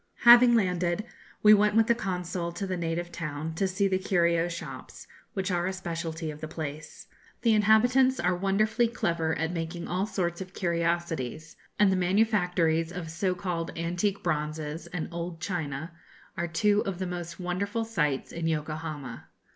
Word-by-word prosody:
Having 240 0 +8
landed, 180 -2 +1 0.4
we 210 0 +9
went 210 0 +4
with 225 0 +5
the 235 - +4
Consul 180 -5 -3
to 200 - -4
the 185 -1 -2
native 170 0 -3
town, 155 -1 -4
to 190 +4 0
see 195 +2 +1
the 190 -1 +1
curio 170 -3 +2
shops, 170 - -8 0.3
which 190 0 -1
are 175 0 0
a 190 - -2
speciality 165 -3 -4
of 150 0 -11
the 155 - -4
place. 155 -1 -7 0.4
The 230 -2 +4
inhabitants 245 +5 +4
are 180 +1 +2
wonderfully 215 +5 +2
clever 170 -8 -1
at 160 +1 -1
making 170 0 -4
all 185 +3 -1
sorts 175 -4 -2
of 185 0 -8
curiosities, 170 -4 -2 0.2
and 205 -2 +5
the - - +2
manufactories 180 -4 +2
of 175 -3 -6
so 180 +2 0
called 175 -2 -4
'antique 175 +4 -1
bronzes' 155 -1 -2
and 180 -3 -4
'old 170 0 -5
china' 160 -3 -3 0.4
are 175 -2 -2
two 205 +6 +2
of 195 -2 -3
the 185 - -3
most 175 -1 -5
wonderful 200 +5 -2
sights 150 -12 -1
in 165 -1 -3
Yokohama. 155 -4 -4
175 Hz, 165 wpm, -28 LUFS, 165-195 Hz, 0.4 s, we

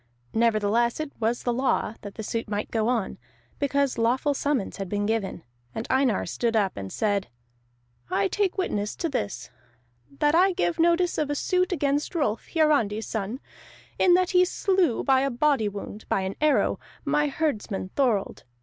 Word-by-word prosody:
Nevertheless 230 +1 +2
it 310 -2 -4
was 235 +1 0
the 245 - 0
law 255 -3 0
that 205 -1 -9
the 220 - -6
suit 230 +1 -3
might 205 0 -3
go 220 -1 +1
on, 235 - -1 0.4
because 280 -2 +1
lawful 255 +5 +2
summons 280 -6 -1
had 195 -2 -5
been 205 +1 -1
given. 210 -5 -2 0.3
And 225 - -3
Einar 260 -5 +2
stood 230 -1 -1
up 200 -3 +1
and 95 -1 -6
said: 205 -2 0 0.8
"I 195 0 +1
take 400 - 0
witness 210 - -1
to 335 - -2
this, 115 - -4 0.7
that 295 - +2
I 370 +3 +5
give 345 -2 -1
notice 345 +1 +3
of 300 -2 0
a 290 - 0
suit 365 +5 +1
against 290 -1 0
Rolf 230 -9 -1
Hiarandi's 285 -10 +2
son, 220 +4 -4 0.6
in 355 -1 +6
that 365 0 +2
he 360 -1 +5
slew 365 - +1
by 265 -1 +4
a 275 - +1
body 265 -3 +2
wound, 205 +1 -8
by 195 - +1
an 190 +1 -3
arrow, 305 -1 +2 0.3
my 295 +1 +2
herdsman 230 -10 -2
Thorold. 240 -8 0
245 Hz, 170 wpm, -26 LUFS, 210-300 Hz, 0.8 s, in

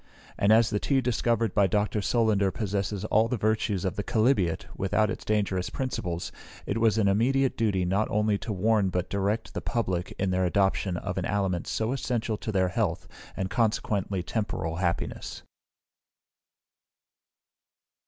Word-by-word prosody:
And 100 - +2
as 110 0 +5
the 105 - 0
tea 135 +4 +1
discovered 115 -3 0
by 100 -1 +4
Dr. 105 +1 0
Solander 105 -3 +2
possesses 100 0 -2
all 110 +1 +3
the 125 - -1
virtues 105 -2 0
of 95 - -2
the 105 - -1
chalybeate, 110 -8 +1
without 105 +2 +1
its - - -6
dangerous 100 -4 0
principles, 90 -10 -3 0.3
it - - -1
was 115 -1 +3
an 105 -3 +3
immediate 130 +7 +2
duty 100 -5 +1
not 100 +4 +1
only 105 -1 +1
to 115 - -5
warn 105 0 +2
but 90 -1 -2
direct 100 +3 -1
the - - -3
Public 90 -7 -2
in 95 -1 0
their 95 0 +1
adoption 95 0 +1
of 95 0 -3
an 90 - -2
aliment 95 -4 -1
so 110 +2 -1
essential 120 -4 -1
to 110 - -4
their 95 -2 +2
health, - - -1 0.3
and 95 0 -2
consequently 100 -4 0
temporal 85 -6 -3
happiness. 85 -2 -3
105 Hz, 155 wpm, -27 LUFS, 95-110 Hz, 0.3 s, as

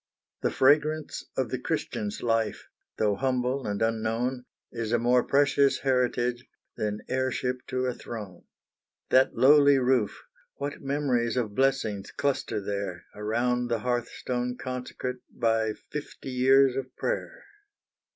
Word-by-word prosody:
The - - +2
fragrance 150 +2 +2
of - - 0
the - - -2
Christian's 105 -1 -3
life, 115 -2 0 0.3
Though 105 -2 +2
humble 130 +3 -1
and 105 +1 -1
unknown, 115 +3 -1 0.3
Is 115 -2 -3
a 120 - +4
more 120 +1 +3
precious 140 0 +3
heritage 125 -2 +1 0.3
Than 105 -1 -2
heirship 130 -1 -1
to 130 0 -1
a 125 - 0
throne. 105 -7 -8 0.7
That 130 +1 +5
lowly 140 +3 +6
roof 125 -4 +1 0.3
what 140 0 -5
memories 130 -4 0
Of 110 -5 -1
blessings 120 -6 0
cluster 140 -6 -1
there, 100 -3 -4
Around 120 +4 0
the 115 -2 -1
hearthstone 125 0 -2
consecrate 125 0 -4
By 110 -1 +1
fifty 145 +1 -8
years 130 +1 +5
of 130 -1 -5
prayer! - - -3
125 Hz, 125 wpm, -27 LUFS, 115-135 Hz, 0.7 s, lowly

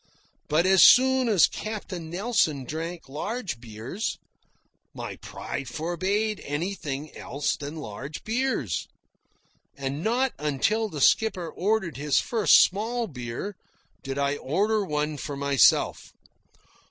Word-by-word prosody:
But 155 +4 +2
as 190 +4 +9
long 260 -1 +1
as 200 -7 +6
Captain 190 -6 -5
Nelson 180 - +1
drank 165 +5 -5
large 180 - -4
beers, 115 - -5 0.8
my - - -6
pride 140 -1 -6
forbade 190 - -1
anything 150 -2 -4
else 140 +1 -2
than 145 +2 -7
large 140 +1 -7
beers. 225 - -1 0.9
And 140 +3 -3
not 250 +3 +1
until 150 +10 0
the 150 -6 -5
skipper 185 0 +3
ordered 190 - -1
his 145 0 +2
first 225 -4 +5
small 230 +5 -1
beer 130 - -6 0.5
did 135 0 -5
I 140 0 0
order 205 +11 +1
one 150 -3 -2
for 145 0 -5
myself. 140 -3 +3
165 Hz, 115 wpm, -26 LUFS, 140-215 Hz, 0.9 s, as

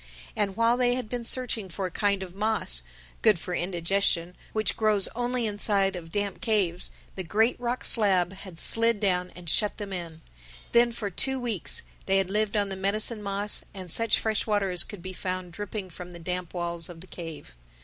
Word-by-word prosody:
And 200 -1 0
while 230 +1 +3
they 245 -1 +2
had 250 -4 -4
been 245 -1 -3
searching 235 -4 +1
for 190 +2 -4
a 180 - -4
kind 200 +1 +1
of 180 -2 -9
moss—good 60 - +1
for 180 +2 -5
indigestion—which 180 +3 0
grows 215 -3 +3
only 245 0 -2
inside 205 -2 +1
of 165 -2 -8
damp 205 -1 -2
caves, 195 -6 +1 0.2
the 190 - -5
great 220 +8 +2
rock 245 +1 -2
slab 190 -5 +4
had 190 -3 -8
slid 230 -1 +5
down 180 -3 +1
and 175 -1 -11
shut 210 +6 +2
them 200 -2 -5
in. 165 -3 -6 0.5
Then 235 0 +5
for 210 -3 -4
two 265 +7 0
weeks 230 -8 +1 0.2
they 195 0 +3
had 190 -1 0
lived 215 +1 0
on 205 -1 +1
the 195 - -4
medicine 210 +3 +1
moss 200 +1 +1
and 185 -3 -7
such 230 +3 +4
fresh 220 -1 -1
water 205 -3 +1
as 180 - +5
could 200 -5 -10
be 185 0 -6
found 185 -1 -4
dripping 200 +1 -6
from 180 +1 -9
the - - -9
damp 180 0 -3
walls 170 -1 -2
of 165 -2 -10
the - - -11
cave. 165 - -9
195 Hz, 190 wpm, -27 LUFS, 180-215 Hz, 0.5 s, slid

